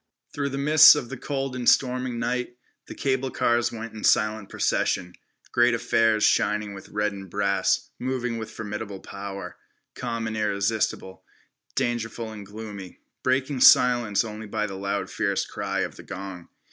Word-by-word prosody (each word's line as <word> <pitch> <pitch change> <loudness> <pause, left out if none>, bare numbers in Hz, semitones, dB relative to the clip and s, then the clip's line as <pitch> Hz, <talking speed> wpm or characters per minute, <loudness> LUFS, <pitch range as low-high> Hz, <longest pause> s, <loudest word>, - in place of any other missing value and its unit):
Through 140 -1 -2
the 135 - -4
mists 150 +3 +8
of 120 -5 -4
the 130 - -5
cold 135 0 -3
and 125 -1 +3
storming 125 -1 +1
night, 120 +1 -2 0.3
the - - -8
cable 130 -1 0
cars 120 -1 +1
went 115 0 -7
in 110 - -9
silent 110 -1 +2
procession, 90 -1 0 0.4
great 120 0 +4
affairs 115 -2 +2
shining 105 0 +2
with 95 - -11
red 105 0 0
and 95 -1 -9
brass, 100 0 0
moving 125 -2 -2
with 110 -1 -6
formidable 105 -2 -6
power, 100 -2 -7 0.4
calm 115 -2 -4
and 110 0 -3
irresistible, 100 -2 -1 0.5
dangerful 115 -1 -2
and 105 -2 -9
gloomy, 100 -3 -9 0.2
breaking 130 +1 0
silence 120 -5 +5
only 110 0 -7
by 105 0 -1
the 100 - -6
loud 100 +1 -3
fierce - - 0
cry - - -3
of - - -4
the - - -9
gong. 95 -2 -8
110 Hz, 160 wpm, -25 LUFS, 100-125 Hz, 0.5 s, mists